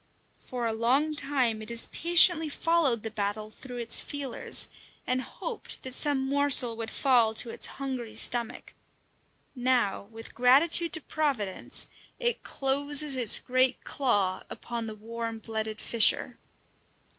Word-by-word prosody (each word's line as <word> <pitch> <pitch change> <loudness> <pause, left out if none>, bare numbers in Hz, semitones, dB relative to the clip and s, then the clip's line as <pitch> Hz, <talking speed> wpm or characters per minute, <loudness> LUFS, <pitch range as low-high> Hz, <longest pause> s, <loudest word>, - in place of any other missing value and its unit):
For 245 -2 -6
a 225 - -2
long 260 +7 0
time 260 -7 0
it 215 - -6
has 235 0 +3
patiently 340 -1 +3
followed 295 -7 0
the 225 - -6
battle 215 0 -4
through 250 +2 -11
its 235 -1 +4
feelers, 280 -3 0 0.4
and 255 0 -1
hoped 460 - -9
that 260 - -7
some 275 -1 +1
morsel 275 -4 +4
would 225 0 -6
fall 235 -5 +1
to 230 +1 +4
its - - +3
hungry 255 -5 -6
stomach; 235 +1 +1 0.8
now, 245 -6 -1
with 225 0 -11
gratitude 305 +7 +3
to 320 - +1
Providence, 265 -12 -1 0.3
it 480 -1 -2
closes 285 +1 +1
its 240 -5 +4
great 255 0 -1
claw 205 -9 -1
upon 235 -1 -6
the 215 - -8
warm 230 +1 -7
blooded 220 -1 -6
fisher. 230 -2 +2
250 Hz, 135 wpm, -27 LUFS, 225-285 Hz, 0.8 s, its